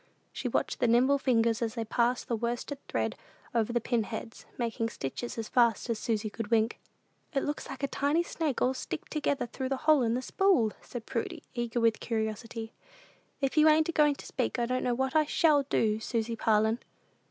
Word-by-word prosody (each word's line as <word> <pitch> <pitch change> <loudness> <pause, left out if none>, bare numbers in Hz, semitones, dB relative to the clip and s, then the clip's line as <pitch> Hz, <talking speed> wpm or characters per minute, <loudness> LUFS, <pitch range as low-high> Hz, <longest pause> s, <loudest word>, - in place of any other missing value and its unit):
She - - -3
watched - - -1
the 245 - +3
nimble 255 +5 +4
fingers 230 -3 +2
as 225 0 -1
they 230 -2 -2
passed 240 +3 +1
the 235 - 0
worsted 240 +5 -3
thread - - -1 0.4
over 230 -1 +1
the 240 - +2
pin 235 0 0
heads, 220 +1 -7
making 230 -1 -1
stitches 230 - -5
as 225 -1 -3
fast 235 -3 +3
as 225 - -2
Susy 220 -2 -1
could 215 0 -5
wink. 225 +1 +1 0.6
"It 275 - +2
looks 295 +1 -3
like 270 +1 -7
a - - +2
tiny 290 +5 +1
snake 315 -5 -1
all 255 - +3
sticked 260 - -6
through 280 -3 -1
the 270 -1 -2
hole 305 -3 +6
in 230 -1 +1
the 255 - -2
spool," 365 - +3
said 240 -2 -8
Prudy, 230 - -3
eager 240 -1 -2
with 230 -1 +3
curiosity. 225 0 -3 0.7
"If 275 +2 0
you 310 +1 +7
ain't 310 +1 +4
a - - +2
goin' 300 -3 +4
to - - -11
speak, 255 -1 -2
I 240 - +1
don't 255 +1 -1
know 245 -1 +1
what 265 +3 -1
I 310 -1 +5
shall 300 -1 +4
do, 215 -1 +2
Susy 230 0 -2
Parlin!" 220 +1 +2
240 Hz, 200 wpm, -30 LUFS, 225-275 Hz, 0.7 s, you